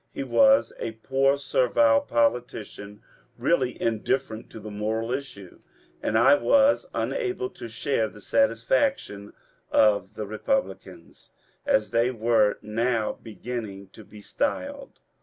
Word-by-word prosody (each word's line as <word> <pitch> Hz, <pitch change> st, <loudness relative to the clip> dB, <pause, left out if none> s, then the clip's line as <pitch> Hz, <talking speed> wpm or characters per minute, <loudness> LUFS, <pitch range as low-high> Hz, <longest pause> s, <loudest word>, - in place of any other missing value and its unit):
He -, -, -5 dB
was 275 Hz, -, +4 dB
a 115 Hz, -, -4 dB
poor 135 Hz, +5 st, +1 dB
servile 120 Hz, -4 st, +3 dB
politician, 115 Hz, -3 st, -2 dB, 0.3 s
really 130 Hz, -7 st, 0 dB
indifferent 115 Hz, 0 st, -2 dB
to -, -, -10 dB
the 105 Hz, 0 st, -9 dB
moral 110 Hz, +3 st, -2 dB
issue, 125 Hz, -9 st, -7 dB, 0.4 s
and 110 Hz, -, 0 dB
I 130 Hz, +5 st, +6 dB
was 280 Hz, -, +3 dB
unable 390 Hz, -4 st, -2 dB
to -, -, -9 dB
share 115 Hz, 0 st, -1 dB
the 105 Hz, -, -14 dB
satisfaction 275 Hz, -, 0 dB, 0.4 s
of 105 Hz, -1 st, +2 dB
the 110 Hz, -, -4 dB
Eepublicans, 265 Hz, -, -4 dB, 0.2 s
— -, -, -37 dB
as 275 Hz, -1 st, +2 dB
they 115 Hz, +1 st, +2 dB
were 115 Hz, -3 st, +2 dB
now 115 Hz, +1 st, -1 dB
beginning 110 Hz, -4 st, -7 dB
to 110 Hz, -, -14 dB
be 105 Hz, +1 st, -14 dB
styled. 280 Hz, -, -4 dB
115 Hz, 125 wpm, -25 LUFS, 110-140 Hz, 0.4 s, I